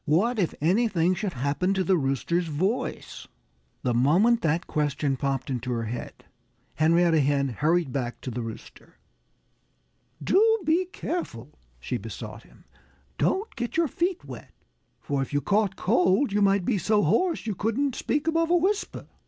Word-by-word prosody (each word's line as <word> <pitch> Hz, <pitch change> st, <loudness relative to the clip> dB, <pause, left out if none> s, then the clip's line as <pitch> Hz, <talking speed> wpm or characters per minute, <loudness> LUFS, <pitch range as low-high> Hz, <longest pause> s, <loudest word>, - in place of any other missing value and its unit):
What 210 Hz, +11 st, +2 dB
if 180 Hz, -, 0 dB
anything 185 Hz, 0 st, +2 dB
should 190 Hz, +1 st, -3 dB
happen 145 Hz, +9 st, 0 dB
to 190 Hz, -, +1 dB
the 190 Hz, 0 st, +3 dB
Rooster's 165 Hz, +4 st, 0 dB
voice? 185 Hz, +10 st, -3 dB, 0.6 s
The 125 Hz, -, +1 dB
moment 180 Hz, -, +3 dB
that 165 Hz, 0 st, 0 dB
question 145 Hz, -2 st, -1 dB
popped 135 Hz, 0 st, -2 dB
into 125 Hz, 0 st, -3 dB
her 115 Hz, -1 st, -2 dB
head, 115 Hz, +2 st, -7 dB, 0.5 s
Henrietta 165 Hz, +1 st, +3 dB
Hen 140 Hz, -1 st, +1 dB
hurried 155 Hz, +3 st, 0 dB
back 120 Hz, -3 st, -3 dB
to 130 Hz, -, -5 dB
the 120 Hz, +1 st, -4 dB
Rooster. 115 Hz, -1 st, -10 dB, 1.3 s
"Do 390 Hz, -, +4 dB, 0.2 s
be 335 Hz, +4 st, +2 dB
careful!" 355 Hz, -1 st, -5 dB, 0.3 s
she -, -, -3 dB
besought -, -, -8 dB
him. -, -, -21 dB, 0.6 s
"Don't 405 Hz, +4 st, 0 dB
get 240 Hz, +5 st, -4 dB
your 335 Hz, -1 st, +3 dB
feet 350 Hz, +6 st, -2 dB
wet! -, -, -10 dB, 0.5 s
For 140 Hz, -1 st, -2 dB
if 135 Hz, -, -5 dB
you 145 Hz, -, +2 dB
caught 200 Hz, +3 st, +1 dB
cold 190 Hz, +8 st, +2 dB
you 205 Hz, -, +2 dB
might 195 Hz, -2 st, +3 dB
be 210 Hz, -3 st, +1 dB
so 210 Hz, +4 st, +2 dB
hoarse 330 Hz, -, +1 dB
that -, -, -16 dB
you 215 Hz, -, -1 dB
couldn't 230 Hz, +8 st, -1 dB
speak 290 Hz, +4 st, -1 dB
above 330 Hz, 0 st, +1 dB
a 350 Hz, -, +4 dB
whisper." 390 Hz, +5 st, -1 dB
180 Hz, 160 wpm, -26 LUFS, 145-235 Hz, 1.3 s, Do